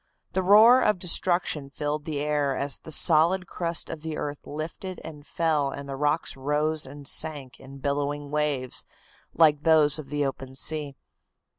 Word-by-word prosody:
The 190 - +1
roar 220 +7 +7
of 210 -2 +2
destruction 175 -4 +1
filled 150 +1 -3
the 150 -3 -3
air 145 -2 0
as 140 0 -2
the 160 - -11
solid 170 +4 +3
crust 170 -1 -4
of 155 - -7
the 160 -1 -5
earth 145 0 -5
lifted 165 +4 -6
and 150 -2 -10
fell 155 -4 0
and 140 0 -7
the 135 - -5
rocks 150 +3 -1
rose 150 +2 -1
and 140 +1 -9
sank 145 -4 -1
in 135 +1 -12
billowing 145 +1 -3
waves 150 -4 -1 0.5
like 150 -3 +4
those 155 -2 +4
of 140 -3 -9
the 145 0 -1
open 135 -1 -6
sea. 150 0 -1
150 Hz, 165 wpm, -26 LUFS, 140-160 Hz, 0.5 s, roar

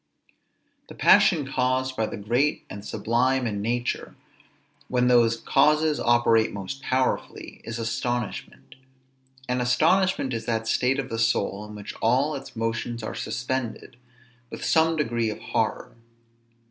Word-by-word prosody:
The - - -10
passion 155 -6 +5
caused 130 0 0
by 110 -2 0
the - - -6
great 120 +9 0
and 100 +1 -8
sublime 120 +5 0
in 105 -3 -2
nature, 120 +3 -2 0.7
when 125 -1 +1
those 120 -2 +4
causes 150 +5 +2
operate 120 -2 +3
most 100 +7 -6
powerfully, 130 0 -2
is 115 - -5
astonishment: 120 0 -4 0.7
and 125 0 0
astonishment 155 +3 +2
is 115 - -4
that 110 -1 -1
state 125 +3 +1
of 135 -2 -3
the 115 - -3
soul 105 -2 0
in 105 0 -10
which 105 -1 -8
all 130 +7 +2
its 135 -1 -8
motions 115 +1 -3
are - - -4
suspended, 125 -2 -4 0.5
with - - -7
some 160 0 +3
degree 120 -7 0
of 105 - -5
horror. - - -2
120 Hz, 135 wpm, -25 LUFS, 115-130 Hz, 0.7 s, passion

